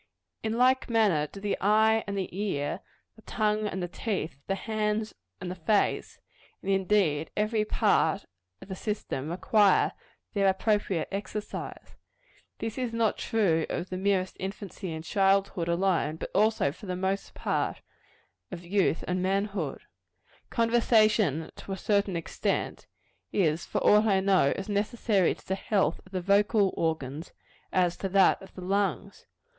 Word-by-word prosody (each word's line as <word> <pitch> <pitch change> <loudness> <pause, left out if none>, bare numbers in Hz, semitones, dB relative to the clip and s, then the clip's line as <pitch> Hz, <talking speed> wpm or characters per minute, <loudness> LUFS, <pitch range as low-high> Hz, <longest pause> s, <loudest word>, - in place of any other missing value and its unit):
In 220 0 -2
like 255 +1 +3
manner 205 -10 +3
do 195 - -11
the 205 0 -1
eye 220 +2 +4
and 200 0 -3
the 185 -2 -4
ear, 170 -8 -2 0.4
the 220 - -17
tongue 215 -1 0
and 190 -2 -3
the - - -2
teeth, 175 - -4
the 195 - 0
hands 215 0 -2 0.3
and 180 -1 -5
the - - -2
face 185 +4 0 0.5
and 195 - -1
indeed 190 -6 +2
every 215 +1 +1
part - - +2 0.4
of - - -13
the 190 - -4
system 185 -9 -4
require 200 +3 +3 0.4
their 200 -2 +2
appropriate 195 -2 +1
exercise. 205 +1 -6 0.6
This 225 +3 -4
is 245 -3 -2
not 230 -2 +1
true 175 -8 +1
of 175 +2 -4
the 185 - -2
merest 190 -1 0
infancy 195 -1 -6
and 160 0 -5
childhood 195 -1 +1
alone, 170 -3 +1
but - - -7
also, 215 -7 +2
for 190 +6 -12
the 180 - -2
most 190 +2 -2
part, - - -2 0.7
of 175 -1 -8
youth 190 -2 +1
and 180 0 0
manhood. 195 -5 -1 0.7
Conversation, 215 - +2
to 195 - -6
a - - -4
certain 200 -2 +1
extent, 170 - -2 0.4
is, 165 -3 +1
for - - -3
aught 210 +1 +5
I 195 -2 +4
know, 190 -7 +3
as 195 - -5
necessary 205 -2 +1
to - - -20
the 190 - 0
health 195 -4 0
of - - -20
the 185 -2 -2
vocal 200 +1 +3
organs, 160 -2 -3 0.4
as 180 -2 +1
to 195 - -3
that 195 +1 +4
of 195 - -14
the 185 - -8
lungs. 195 +2 -2
195 Hz, 155 wpm, -28 LUFS, 180-210 Hz, 0.7 s, aught